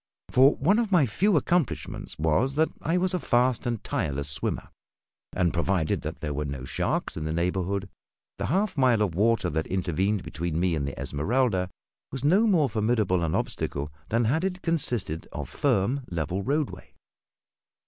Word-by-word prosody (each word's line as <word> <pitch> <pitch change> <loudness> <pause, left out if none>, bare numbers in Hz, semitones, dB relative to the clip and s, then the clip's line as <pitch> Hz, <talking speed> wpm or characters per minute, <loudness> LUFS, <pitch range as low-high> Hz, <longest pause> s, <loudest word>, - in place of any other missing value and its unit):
For 135 +4 +6
one 195 +10 +3
of 225 -4 -1
my 170 -7 +5
few 185 - +2
accomplishments 165 0 -1
was 80 - +1
that 160 +2 +3
I 165 +3 +1
was 185 +1 +1
a 180 - +1
fast 125 -3 +1
and 120 -3 -2
tireless 70 0 -2
swimmer, 75 - -1 0.6
and 90 -3 +1
provided 85 -1 0
that - - -6
there 75 -2 -2
were 75 +1 -2
no 70 -3 -5
sharks - - -1
in 80 - -4
the 80 - -2
neighbourhood 95 +3 -1 0.5
the - - -1
half 200 +2 +1
mile 120 -5 +4
of 95 -5 -1
water 115 +6 +2
that 80 +1 -1
intervened 95 +2 0
between 80 +1 -3
me 90 -1 +2
and 70 -3 -1
the 70 - -6
Esmeralda 95 - 0 0.4
was 135 0 -5
no 190 +10 +4
more 170 -9 +4
formidable 110 -5 +1
an 80 - 0
obstacle 70 +1 -3 0.2
than 115 +1 +2
had 150 +10 +1
it 185 -1 -2
consisted 120 - -1
of - - -4
firm, 120 +9 +1
level 85 +3 -2
roadway. 145 +6 -2
105 Hz, 170 wpm, -27 LUFS, 85-140 Hz, 0.6 s, For